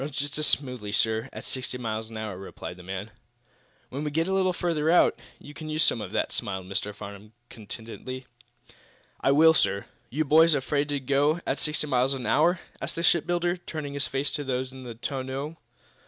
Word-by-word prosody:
"Runs 140 0 -4
just 145 +1 -2
as 155 - +5
smoothly, 125 -7 0
sir, 110 +3 +1
at - - -8
sixty 130 -1 -2
miles 110 -2 -3
an 115 - -7
hour," 110 -3 -4
replied 95 -1 -7
the 90 - -12
man. 95 +4 -5 0.8
"When 140 +3 -4
we 150 - -1
get 160 +3 0
a 190 - 0
little 190 -1 +3
further 165 -3 0
out, 175 - +5 0.2
you 145 - -12
can 155 +1 -7
us 155 +1 +2
some - - +3
of - - -6
that," - - 0
smiled 95 -2 -3
Mr. 100 +2 -2
Farnum, 105 +1 -10 0.2
contentedly. 115 +4 -7 0.9
"I 135 - +3
will, 160 +3 +7
sir." 100 -10 +2 0.2
"You 155 +5 0
boys 160 +2 +6
afraid 145 +1 0
to 145 -1 0
go 140 +4 +2
at - - 0
sixty 150 0 0
miles 135 -1 +2
an 130 -2 -5
hour?" 170 +4 +4 0.2
asked - - -4
the 170 - -2
shipbuilder, 175 +1 +2
turning 155 -4 -6
to 140 - -3
face 140 0 0
those 130 -3 -2
in 130 -1 -10
the 120 -2 -7
tonneau. 135 +5 -4
135 Hz, 200 wpm, -27 LUFS, 115-155 Hz, 0.9 s, will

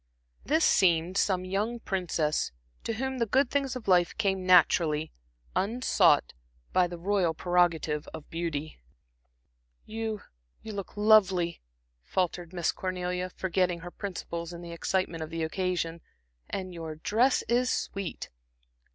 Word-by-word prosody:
This 310 +4 +3
seemed 175 -1 +3
some 185 -2 +1
young 210 +6 -1
princess, 170 -7 -1 0.3
to 230 - -1
whom 265 +3 -3
the 230 - +1
good 260 +4 +2
things 275 -2 0
of 245 -5 -7
life 180 -2 +3
came 190 -3 0
naturally, 160 -3 +4 0.4
unsought, 225 - +3 0.4
by 180 -1 +4
the 175 0 -7
royal 180 -2 +1
prerogative 170 -4 +1
of 155 - -9
beauty. 160 -2 -3 1.1
"You 220 -1 -4 0.4
you 220 - -6
look 200 0 -7
lovely," 195 -5 +4 0.4
faltered 175 - -2
Miss 175 -4 0
Cornelia, 180 0 -3
forgetting 180 -2 0
her 175 0 -8
principles 175 -4 -5
in 170 0 -8
the 170 - -8
excitement 170 -1 -1
of 160 - -4
the 165 0 -3
occasion 170 -1 -2 0.5
"and 185 -2 -4
your 165 -2 -6
dress 230 - +2
is 245 +1 +1
sweet." 195 -3 -3
180 Hz, 135 wpm, -29 LUFS, 170-205 Hz, 1.1 s, naturally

